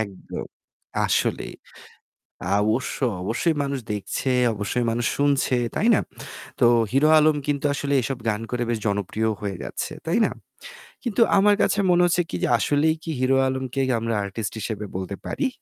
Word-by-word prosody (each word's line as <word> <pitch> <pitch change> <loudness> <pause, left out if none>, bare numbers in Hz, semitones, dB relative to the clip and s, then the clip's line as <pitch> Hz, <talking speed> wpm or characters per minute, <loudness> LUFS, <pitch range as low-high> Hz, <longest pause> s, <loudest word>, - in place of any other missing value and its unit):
একদম। 100 -4 -6 0.6
আসলেই - - 0 1.0
অবশ্যই, 120 +4 0
অবশ্যই 135 - 0
মানুষ 140 -1 -2
দেখছে, 105 +6 -2 0.2
অবশ্যই 105 +4 -1
মানুষ 120 +1 -1
শুনছে। 140 -3 +2 0.2
তাই 225 - +1
না? - - +3 0.6
তো - - +5 0.3
হিরো 140 +4 +4
আলম 155 0 +4
কিন্তু 145 -1 -1
আসলে 140 0 -2
এসব 130 +2 -3
গান 105 0 -1
করে 125 -1 -1
বেশ 115 -2 0
জনপ্রিয় 100 +2 -1
হয়ে 100 -2 -3
গেছে। - - -4
তাই 165 +7 +1
না? - - -1 0.7
কিন্তু 240 -2 -2 0.2
আমার 205 +1 +5
কাছে 205 - +1
মনে 175 0 +4
হচ্ছে 175 0 +2
কি - - -3
যে - - +2
আসলেই 150 +5 +2
কি 165 - -5
হিরো 130 +1 +3
আলমকে 130 0 -2 0.2
আমরা 115 0 -1
artist 100 +2 -4
হিসেবে 105 -1 -4
বলতে 95 +1 -4
পারি? 280 - -1
130 Hz, 160 wpm, -24 LUFS, 110-150 Hz, 1.0 s, তো